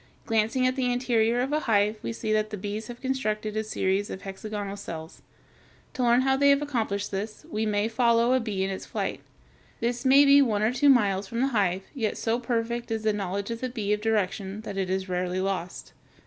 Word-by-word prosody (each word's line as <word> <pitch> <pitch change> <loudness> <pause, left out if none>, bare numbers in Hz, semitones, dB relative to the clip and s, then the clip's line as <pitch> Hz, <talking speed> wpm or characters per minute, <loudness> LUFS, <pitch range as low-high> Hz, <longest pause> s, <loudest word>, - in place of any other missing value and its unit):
Glancing 225 +3 +1
at 255 0 +2
the 255 -2 0
interior 240 -1 +2
of 270 +3 -1
a 305 - +2
hive 210 -5 +2
we - - -3
see 220 -1 -2
that 215 0 +1
the 210 - -5
bees 205 +3 -5
have 240 -1 -8
constructed 215 -5 -2
a 220 - 0
series 200 -1 -1
of 190 - -7
hexagonal 200 +1 -5
cells. 165 -5 -8 0.7
To 260 - -3
learn 240 +1 +4
how 265 0 +2
they 280 +1 +4
have 280 +1 +4
accomplished 220 -8 -2
this, 210 +2 -5
we 215 +1 -1
may 205 0 +1
follow 235 +1 +3
a 260 - +4
bee 210 -5 -2
in 195 - -1
its 190 - -6
flight. - - -3 0.6
This 240 +1 -1
may 275 +2 +6
be 280 0 +7
one 215 -6 +1
or 220 +3 +2
two 285 +3 +4
miles 205 -6 +3
from 230 +4 -3
the 270 - +2
hive, 195 -6 +1
yet 225 -7 -2
so 230 +1 0
perfect 235 -1 -2
is 220 -1 -2
the 215 -1 +2
knowledge 200 +1 -3
of 230 - -5
the 255 - -2
bee 215 -4 -1
of 210 - -2
direction, 205 -2 -1
that 205 -2 -7
it 190 -1 -2
is 190 0 -1
rarely 180 0 -1
lost. 190 -2 -3
220 Hz, 220 wpm, -27 LUFS, 200-245 Hz, 0.7 s, be